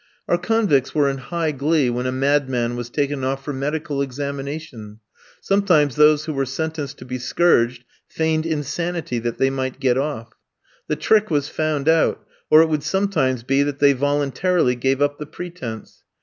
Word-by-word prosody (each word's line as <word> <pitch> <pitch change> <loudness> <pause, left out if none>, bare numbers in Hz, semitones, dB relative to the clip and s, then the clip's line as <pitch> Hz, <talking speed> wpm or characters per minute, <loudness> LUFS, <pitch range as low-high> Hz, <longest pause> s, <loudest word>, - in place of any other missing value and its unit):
Our 175 - +2
convicts 185 - +1
were 145 -2 +3
in 135 0 -3
high 160 +5 -2
glee 145 -1 +1
when 125 +1 -2
a - - 0
madman 130 -3 0
was 120 -1 -5
taken 140 0 -2
off 135 +1 -2
for 145 - -3
medical 145 +1 -2
examination; 140 -4 -5 0.4
sometimes 180 -9 +2
those 150 0 +4
who 155 - -3
were 135 -1 -1
sentenced 155 0 -4
to - - -11
be 125 0 -5
scourged, 125 -3 +2 0.2
feigned 160 0 -1
insanity 160 -2 -2
that 120 0 -3
they 135 0 +2
might 130 -1 -3
get 130 -2 +2
off. 115 -6 -4 0.5
The - - 0
trick 215 -1 +2
was 145 -3 0
found 155 -2 -2
out, 160 0 +2 0.2
or 155 +1 +8
it 165 - -1
would 155 -2 0
sometimes 155 -8 0
be 135 +3 +2
that 145 -1 -1
they 145 -1 +5
voluntarily 145 +2 +1
gave 135 +3 0
up 145 0 -1
the 150 - -6
pretence. 150 -12 -8
145 Hz, 175 wpm, -21 LUFS, 130-155 Hz, 0.5 s, or